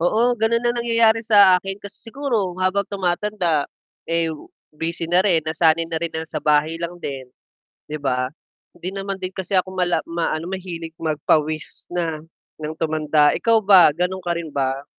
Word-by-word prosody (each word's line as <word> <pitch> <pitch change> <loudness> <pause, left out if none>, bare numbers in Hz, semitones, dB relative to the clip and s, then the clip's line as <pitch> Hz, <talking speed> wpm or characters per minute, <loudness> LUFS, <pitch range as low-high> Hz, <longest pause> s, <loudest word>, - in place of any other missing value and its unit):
Oo 230 +8 +2
ganun 225 +1 +1
ang 240 0 0
nangyayari 230 -1 +2
sa 200 -4 +6
akin 195 +2 -5
kasi 200 -1 -9
siguro 230 -6 -2
habang 190 +2 +1
tumatanda, 180 -4 0 0.4
eh, 165 0 0 0.4
busy 165 +2 -4
na 180 +2 +3
rin 175 -6 +4
nasanay 160 +1 +1
na 165 - -3
rin 165 +1 -2
na 160 0 -4
sa - - -6
bahay 150 +1 +2
lang 170 +1 -6
din, 135 -4 -5 0.7
'di 155 - -3
ba? 125 -3 -1 0.5
Hindi 180 +2 -5
naman 195 0 -4
din 185 0 -4
kasi 190 0 -1
ako 185 +1 0
mala 180 -2 0
maano 165 -1 -2
mahilig 170 -3 -6
magpawis 155 0 -1
na, 165 -3 -2 0.4
ng 155 +1 -4
tumanda. 155 -2 +2
Ikaw 230 -1 +3
ba 190 -5 +8
gano'n 180 +5 -2
ka 175 -1 -2
rin 160 -3 -6
ba? 135 0 -1
175 Hz, 170 wpm, -21 LUFS, 155-195 Hz, 0.7 s, ba